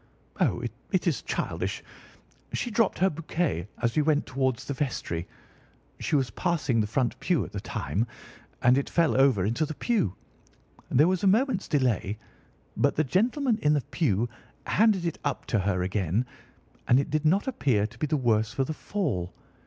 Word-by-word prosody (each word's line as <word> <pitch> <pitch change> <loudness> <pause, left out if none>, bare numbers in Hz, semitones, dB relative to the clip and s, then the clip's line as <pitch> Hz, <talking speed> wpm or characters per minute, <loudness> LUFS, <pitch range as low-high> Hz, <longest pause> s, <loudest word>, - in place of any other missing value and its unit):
"Oh, - - +1 0.3
it - - +1
is - - +1
childish. - - -3 0.7
She 245 - -2
dropped 220 -2 +2
her 190 +2 +3
bouquet 155 - -2 0.2
as 120 -1 +1
we 155 - +4
went 150 -1 +2
towards 130 -1 -1
the 140 - -3
vestry. 115 - -3 0.7
She - - 0
was 130 -6 +1
passing 150 - 0
the 105 - -1
front 120 +2 -1
pew 165 - +1
at - - -11
the - - -4
time, 95 - -2 0.6
and 125 +3 +5
it 140 - -4
fell 170 -2 +2
over 130 -8 +4
into 115 +9 0
the 155 0 -3
pew. 170 - 0 0.7
There 150 +6 +5
was 185 0 0
a - - +4
moment's 225 +1 +2
delay, 120 - +1 0.6
but - - +2
the 155 - +2
gentleman 230 - +1
in 150 0 +4
the 145 - +2
pew 120 - +1 0.4
handed 210 -4 +3
it 170 - -2
up 145 - -2
to 110 - +4
her 95 -2 0
again, 95 +4 0 0.6
and 125 - +5
it 140 - -2
did 155 0 0
not 180 +6 +3
appear 130 - +1
to 115 +2 -9
be 155 - 0
the 150 - +1
worse 110 -4 +2
for 135 +2 0
the 155 - -3
fall. 145 - -2
140 Hz, 180 wpm, -27 LUFS, 110-170 Hz, 0.7 s, and